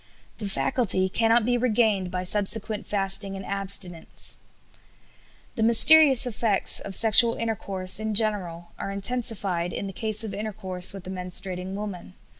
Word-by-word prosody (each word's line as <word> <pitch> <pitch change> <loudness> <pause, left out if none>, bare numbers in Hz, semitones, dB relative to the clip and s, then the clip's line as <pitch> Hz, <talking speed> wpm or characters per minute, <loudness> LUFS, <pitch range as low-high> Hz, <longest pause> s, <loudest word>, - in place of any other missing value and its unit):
The 205 -2 -5
faculty 195 -4 0
cannot 225 +2 +1
be 245 0 0
regained 215 -6 0
by 180 0 -5
subsequent 210 +2 0
fasting 195 0 +2
and 195 0 -9
abstinence." 190 -4 -2 1.1
The - - -5
mysterious 265 +4 +5
effects 220 -4 +1
of 195 - -3
sexual 230 +2 +5
intercourse 200 -4 0
in 220 -1 -4
general 185 -6 0
are - - -6
intensified 200 -4 -1
in - - -6
the 195 - -8
case 220 +2 -1
of 215 - -7
intercourse 195 -4 -3
with 195 -2 -11
a 185 - -7
menstruating 185 0 -3
woman. 195 - -8
200 Hz, 140 wpm, -24 LUFS, 185-225 Hz, 1.1 s, mysterious